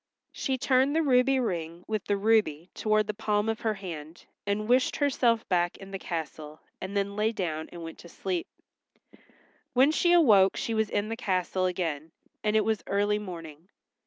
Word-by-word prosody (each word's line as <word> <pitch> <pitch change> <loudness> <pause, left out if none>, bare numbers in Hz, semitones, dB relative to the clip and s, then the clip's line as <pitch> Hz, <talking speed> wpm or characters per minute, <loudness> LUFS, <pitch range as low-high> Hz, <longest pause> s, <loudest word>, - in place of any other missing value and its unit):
She 265 -2 -2
turned 265 +3 +2
the 325 - +3
ruby 265 -1 +4
ring 170 -6 -3
with 215 -2 -2
the 205 - +1
ruby 195 -6 +1
toward 215 0 +1
the 210 - -3
palm 210 0 0
of 225 0 -1
her 220 -1 -1
hand, 165 -4 -8 0.2
and 210 +1 -1
wished 250 +2 +3
herself 245 -5 +1
back 175 -1 +1
in 195 0 -11
the 195 - -5
castle 155 -3 -6 0.2
and 190 +2 -4
then 200 0 -1
lay 215 +1 +1
down 160 -7 -3
and 170 -1 -8
went 165 0 -8
to 170 - -12
sleep. 180 -1 -3 1.3
When 265 +4 +5
she 345 +2 +2
awoke 210 - +5
she 230 - -2
was 220 -1 +1
in 205 +1 -1
the 225 - -2
castle 185 -3 0
again, 165 -4 -3 0.3
and 210 0 +1
it 220 - +3
was 220 -2 0
early 205 +1 +1
morning. 165 -4 -9
205 Hz, 185 wpm, -28 LUFS, 175-225 Hz, 1.3 s, When